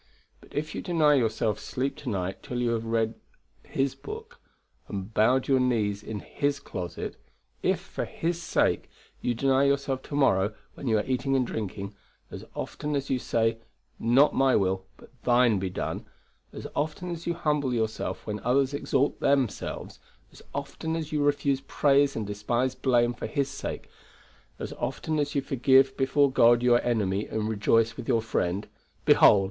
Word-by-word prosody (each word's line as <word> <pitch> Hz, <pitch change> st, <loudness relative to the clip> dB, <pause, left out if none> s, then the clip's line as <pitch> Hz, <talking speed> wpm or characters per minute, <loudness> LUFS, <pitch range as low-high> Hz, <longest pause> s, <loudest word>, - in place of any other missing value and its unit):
But -, -, -19 dB
if 150 Hz, +1 st, -2 dB
you -, -, -4 dB
deny 160 Hz, -4 st, +3 dB
yourself 110 Hz, -4 st, +1 dB
sleep 135 Hz, +2 st, -3 dB
to 140 Hz, -, -5 dB
night 95 Hz, -3 st, -3 dB
till 125 Hz, -, -4 dB
you 120 Hz, -1 st, +1 dB
have 115 Hz, -1 st, -1 dB
read 115 Hz, 0 st, 0 dB, 0.5 s
His 135 Hz, -1 st, -1 dB
book 450 Hz, +2 st, -9 dB, 0.5 s
and 100 Hz, +1 st, -6 dB
bowed 125 Hz, +5 st, +3 dB
your 135 Hz, -1 st, +4 dB
knees 110 Hz, -5 st, +1 dB
in 105 Hz, -1 st, -6 dB
His 145 Hz, 0 st, -1 dB
closet; 90 Hz, -2 st, -6 dB, 0.4 s
if, -, -, +1 dB
for -, -, -5 dB
His 170 Hz, +1 st, -2 dB
sake, -, -, +1 dB, 0.3 s
you 120 Hz, -, 0 dB
deny 135 Hz, +2 st, +3 dB
yourself 140 Hz, -1 st, +1 dB
to 145 Hz, -, -7 dB
morrow 105 Hz, -7 st, +3 dB, 0.2 s
when 140 Hz, -, -7 dB
you 110 Hz, -2 st, +3 dB
are 105 Hz, -, -1 dB
eating 130 Hz, +1 st, 0 dB
and 130 Hz, -2 st, +2 dB
drinking; 100 Hz, -3 st, -5 dB, 0.4 s
as -, -, -7 dB
often 150 Hz, 0 st, -3 dB
as 140 Hz, -1 st, -2 dB
you 130 Hz, -, +1 dB
say, 115 Hz, -1 st, 0 dB, 0.4 s
"Not 130 Hz, +6 st, +4 dB
my 135 Hz, -1 st, +3 dB
will, 95 Hz, -1 st, 0 dB
but -, -, -16 dB
Thine 120 Hz, -4 st, +4 dB
be 95 Hz, 0 st, -2 dB
done"; 90 Hz, -, -4 dB, 0.4 s
as -, -, -8 dB
often 155 Hz, +4 st, -2 dB
as 170 Hz, 0 st, -6 dB
you 170 Hz, -, 0 dB
humble 150 Hz, -5 st, 0 dB
yourself 110 Hz, -2 st, -2 dB
when 105 Hz, 0 st, -3 dB
others 130 Hz, +5 st, +2 dB
exalt 140 Hz, 0 st, 0 dB
themselves; 135 Hz, -5 st, -1 dB, 0.3 s
as -, -, -15 dB
often 160 Hz, 0 st, -4 dB
as 160 Hz, -2 st, -4 dB
you 150 Hz, -1 st, 0 dB
refuse 140 Hz, -1 st, +1 dB
praise 140 Hz, 0 st, +3 dB
and 110 Hz, -, -2 dB
despise 120 Hz, +5 st, -1 dB
blame 120 Hz, -2 st, +2 dB
for -, -, -5 dB
His 140 Hz, -2 st, -1 dB
sake; -, -, -5 dB, 0.7 s
as -, -, -5 dB
often 155 Hz, -1 st, -2 dB
as 145 Hz, 0 st, -1 dB
you 140 Hz, -, +2 dB
forgive 135 Hz, 0 st, +4 dB
before 140 Hz, +1 st, +3 dB
God 120 Hz, -1 st, +5 dB
your 120 Hz, -1 st, +5 dB
enemy, 105 Hz, -4 st, 0 dB
and 110 Hz, -1 st, -2 dB
rejoice 110 Hz, +1 st, +2 dB
with 120 Hz, -, -8 dB
your 115 Hz, -1 st, +2 dB
friend, 100 Hz, -2 st, -1 dB, 0.4 s
Behold! 100 Hz, -, +7 dB
125 Hz, 175 wpm, -27 LUFS, 110-140 Hz, 0.7 s, Behold